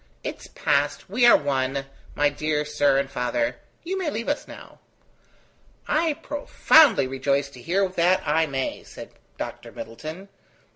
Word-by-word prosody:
It - - -5
is - - -11
past, 145 +5 -1
we 240 +3 +4
are - - +8
one, 135 -1 -1 0.3
my 145 0 +3
dear 150 +1 -1
sir 145 -2 +2
and 140 0 0
father. 125 -2 -1 0.3
You 380 +3 -3
may 355 -5 -1
leave 230 -3 -4
us 290 - -2
now." - - -13 1.1
"I 315 0 +1
profoundly 285 - +4
rejoice 140 +1 -1
to 125 - -13
hear 190 +7 +1
that 180 0 +2
I 160 +2 +2
may," 135 -2 -3
said - - -11 0.3
Dr. - - -7
Middleton. 155 - -8
150 Hz, 150 wpm, -24 LUFS, 135-200 Hz, 1.1 s, are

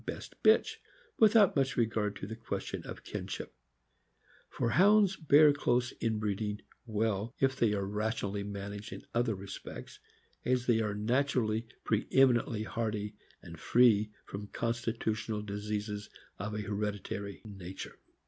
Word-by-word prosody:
203 - - -2
best - - -11
bitch, 440 - +5 0.4
without 215 -3 +6
much 135 -1 +1
regard 110 -3 +1
to - - -6
the 110 +2 -6
question 115 -1 -4
of - - -8
kinship; - - -5 1.0
for 115 - -1
Hounds 200 - +5
bear 150 -3 +6
close 125 -3 +1
inbreeding 105 -1 -1 0.3
well 110 +1 -1
if 135 0 +2
they 115 -5 +2
are 100 -1 -1
rationally 105 0 -2
managed 100 +1 -6
in - - -8
other 115 -2 +1
respects, 100 0 -8 0.4
as 125 -1 +1
they 115 -3 +3
are 105 -2 -1
naturally 115 0 +1 0.2
preemi - - 0 0.3
nently 110 -2 -4
hardy 110 -2 -2 0.3
and 85 -2 -10
free 110 -2 +4 0.2
from 105 +1 -7
constitutional 115 -2 -2
diseases 105 0 -4 0.3
of 105 +2 -3
a 105 - -2
her 105 0 -4
editary 100 -1 -4
nature. 95 -3 -8
110 Hz, 140 wpm, -32 LUFS, 105-120 Hz, 1.0 s, without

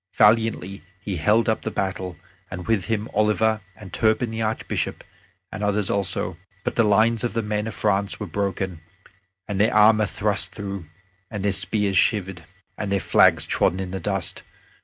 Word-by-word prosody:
Valiantly 105 -3 +2 0.2
he 95 -1 -4
held 105 +10 +3
up 110 - +1
the - - -3
battle, 95 -4 -3 0.3
and 90 -2 -6
with 110 -5 +1
him 110 -1 -1
Oliver, 110 +1 +2
and 105 -3 -12
Turpin 110 +1 +1
the 115 0 -3
Archbishop, 110 0 -2 0.5
and 105 - -5
others 105 -1 +1
also; 95 -3 -1 0.2
but - - -2
the - - +4
lines 110 +3 +3
of 120 - -1
the 115 -1 -1
men 105 0 -2
of 110 - -6
France 100 -1 0
were 105 - -3
broken, 95 -2 -3 0.7
and 100 -1 -1
their 110 - +4
armor 110 0 +5
thrust 100 +1 -1
through 100 -5 -6 0.4
and 105 -2 -4
their 100 - +3
spears 100 0 +1
shivered, 95 -5 0 0.4
and 100 -2 -3
their 100 - +2
flags - - +4
trodden 90 - +1
in 95 -1 -4
the 95 - -3
dust. 95 -4 -2
105 Hz, 175 wpm, -23 LUFS, 95-110 Hz, 0.7 s, armor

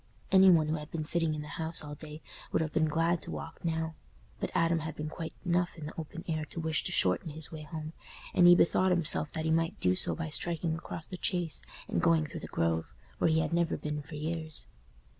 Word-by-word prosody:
Any 190 -1 +8
one 160 -4 +5
who 155 +1 0
had 150 0 -8
been 160 -2 -3
sitting 165 0 +2
in 150 - -4
the - - -9
house 160 0 0
all 150 0 -7
day 150 +1 -9 0.3
would - - +2
have 155 - -4
been 155 -1 +3
glad 165 +2 +1
to - - -7
walk - - -7
now; 160 -1 -1 0.5
but - - -2
Adam 165 0 +3
had 155 -1 -5
been 155 0 -4
quite 165 0 -6
enough 175 0 +1
in 155 - -7
the 150 - -6
open 165 +2 -7
air 155 -2 -1
to 165 - -7
wish 160 -1 +1
to - - 0
shorten 95 - +2
his 155 +1 -5
way 155 -1 -7
home, 155 +1 -6 0.4
and 175 - +6
he 175 - +10
bethought 185 +2 +4
himself 170 -3 +2
that 160 -1 -2
he 160 - +2
might 165 +1 +1
do 90 0 +3
so - - +1
by 165 -1 -4
striking 165 +1 -1
across 165 -1 -6
the 185 - -7
Chase 175 -4 0 0.3
and - - 0
going 165 -2 +4
through - - -7
the - - -7
Grove, 80 -6 -1 0.2
where - - +3
he 160 0 +3
had 165 - -2
never 170 -1 +1
been 150 0 -3
for 150 +2 -10
years. 160 0 -2
160 Hz, 240 wpm, -31 LUFS, 155-170 Hz, 0.5 s, he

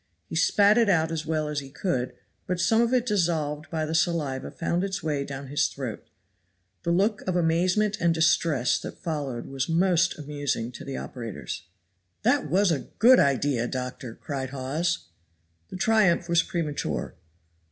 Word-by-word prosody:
He 100 - -7
spat 205 +6 +4
it 230 -3 +3
out 165 -3 +2
as 160 -1 -3
well 155 -1 0
as 150 -1 -2
he 135 -1 -9
could, 135 -4 -2 0.3
but 180 0 -1
some 225 +5 +3
of 235 0 +2
it 250 -2 +2
dissolved 160 -8 0
by 160 -1 -1
the 155 - -3
saliva 155 -5 0
found 170 +2 -1
its 195 -2 -3
way 150 -3 -1
down 140 0 -6
his 145 +2 +1
throat. - - -6 0.7
The - - -3
look 195 +5 +2
of 185 - 0
amazement 180 +5 +2
and 170 0 +4
distress 160 -5 +2
that - - -8
followed 145 -8 -4
was 135 +3 -3
most 175 +1 +2
amusing 145 -5 -3
to 125 - -9
the 135 - -5
operators. 115 -7 -6 0.6
"That 150 - +2
was, 190 +3 +3
a 145 -5 -2
good 250 +4 +7
idea, 135 -3 +2
doctor," 125 -2 -5
cried 135 -3 -5
Hawes. 140 +6 -2 0.6
The - - -6
triumph 190 -4 +3
was 170 -1 +4
premature. 160 -5 -3
160 Hz, 165 wpm, -26 LUFS, 140-180 Hz, 0.7 s, good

